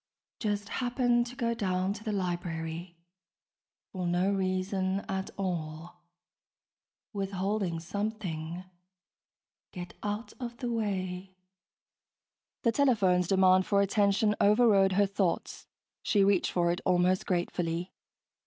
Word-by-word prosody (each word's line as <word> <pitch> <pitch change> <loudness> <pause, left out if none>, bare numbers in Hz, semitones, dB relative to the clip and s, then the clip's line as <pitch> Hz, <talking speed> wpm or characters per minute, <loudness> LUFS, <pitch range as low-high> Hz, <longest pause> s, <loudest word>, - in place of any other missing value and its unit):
(Just 205 -1 -2
happened 245 -1 +1
to 245 - -9
go 235 -2 0
down 190 -3 0
to 210 - -10
the 220 - -2
library... 175 -2 -3 0.9
for 180 -2 -3
no 180 +3 +2
reason 190 0 0
at 190 -1 -4
all... 175 -2 -4 1.1
withholding 195 -2 -1
something... 180 -3 -4 1.1
get 175 -2 -7
out 210 +2 -4
of 240 -2 -6
the 245 -2 -3
way....) 190 -4 -3 1.3
The 230 - +4
telephone's 205 - +3
demand 185 0 +4
for 200 - +3
attention 205 +1 +2
overrode 205 -3 +5
her 200 +2 +4
thoughts. 195 -3 -2 0.3
She 200 -2 +3
reached 195 -2 +3
for 170 -1 +2
it 175 - -3
almost 180 +1 +2
gratefully. 175 -1 -1
190 Hz, 110 wpm, -30 LUFS, 180-210 Hz, 1.3 s, overrode